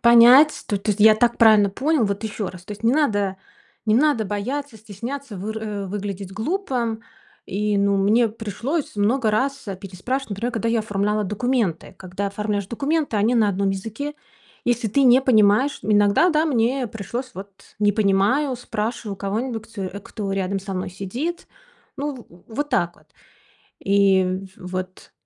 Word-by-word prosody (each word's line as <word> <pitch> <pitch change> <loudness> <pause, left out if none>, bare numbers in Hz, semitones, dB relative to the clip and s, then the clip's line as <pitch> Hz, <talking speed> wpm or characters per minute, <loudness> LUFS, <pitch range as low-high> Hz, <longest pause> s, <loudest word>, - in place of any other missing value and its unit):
понять. 240 +6 +7
То 205 - 0
то 210 +2 -2
есть 205 - -2
я 215 0 +8
так 235 +2 +1
правильно 215 -3 +6
понял, 285 +3 +1
вот 200 +1 -2
еще 215 -2 -3
раз, 180 -1 -11
то 210 - -7
есть 205 +2 -11
не 230 +2 +3
надо, 205 -10 +1 0.5
не 215 - +3
надо 265 -3 +3
бояться, 225 +6 -4
стесняться, 225 +4 -7
выр 210 0 -4
выглядеть 200 -1 -5
глупо. 240 - -2 0.5
И, 205 +1 0
ну, 200 0 +2
мне 220 +4 +3
пришлось 230 - -4
много 220 +3 +2
раз 270 +5 -1
переспрашивать, 225 +7 -4
например, 225 +5 -3
когда 230 -1 -1
я 230 0 +2
оформляла 210 0 -1
документы. 210 -3 -1
Когда 190 +2 -5
оформляешь 205 0 -2
документы, 280 +3 -1
они 220 +4 +2
на 215 -3 +4
одном 195 0 0
языке. 225 +10 -5 0.5
Если 240 -2 0
ты 275 +7 +2
не 255 0 +6
понимаешь, 225 +2 +4
иногда, 205 - +4
да, 310 -1 +2
мне 255 -3 +1
пришлось: 235 +4 -5
"Вот, 195 +2 -7 0.3
не 205 0 +3
понимаю", 215 +7 +2
спрашиваю 220 -2 -4
у - - -16
кого-нибудь, 225 +3 -4 0.3
кто 200 -2 -5
рядом 195 0 -1
со 195 0 -6
мной 185 0 -3
сидит. 240 - -4 0.5
Ну 280 -4 -5
в 175 +6 -17
вот 290 +1 -2
так, 175 - 0
вот - - -24 0.7
и 195 -1 +2
в-вот. 185 0 -7
215 Hz, 160 wpm, -22 LUFS, 200-245 Hz, 0.7 s, я